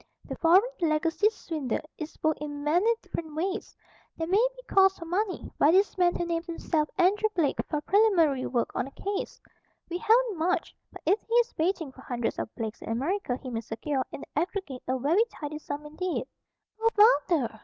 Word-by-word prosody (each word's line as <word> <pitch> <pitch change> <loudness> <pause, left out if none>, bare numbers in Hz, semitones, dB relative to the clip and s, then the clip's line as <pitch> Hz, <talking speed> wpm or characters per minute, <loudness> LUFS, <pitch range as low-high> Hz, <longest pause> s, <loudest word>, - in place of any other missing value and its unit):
The - - -4
'foreign 355 +4 +6 0.2
legacy 325 +5 +2
swindle' 310 - -4
is 310 0 -6
worked 310 -1 +1
in 290 -1 -5
many 350 +10 +3
different 315 -2 -6
ways. 380 +6 -3 0.4
There 325 - -1
may 390 +7 +3
be - - -13
calls 385 -5 +4
for 335 - -8
money, 375 +4 -2
by 290 - +6
this 385 +4 +4
man 355 -2 +3
who 345 - -1
names 335 0 -2
himself 320 -2 -1
Andrew 400 +4 +3
Blake, 310 -6 +1
for 300 -2 -1
preliminary 340 -9 +3
work 240 -2 -1
on - - -1
the 275 - -10 0.3
case. - - -7 0.5
We 350 - -2
haven't 450 -4 +3
much; 360 +3 0 0.2
but - - -12
if 410 - +3
he 455 - -7
is 480 0 +3
baiting 325 -3 -1
for 260 - -15
hundreds 240 -3 -3
of - - -3
Blakes 225 -2 -5
in - - -7
America 270 - -1
he 260 -1 -8
may 225 -1 -2
secure, 260 +5 -2
in - - -7
the 300 - -2
aggregate, 350 -8 -4
a 260 +1 +1
very 315 - +3
tidy 305 -9 -7
sum 295 0 -6
indeed." 345 +4 -3 0.5
"Oh, 455 0 +4
Father!" 315 - +4
330 Hz, 195 wpm, -28 LUFS, 290-385 Hz, 0.5 s, foreign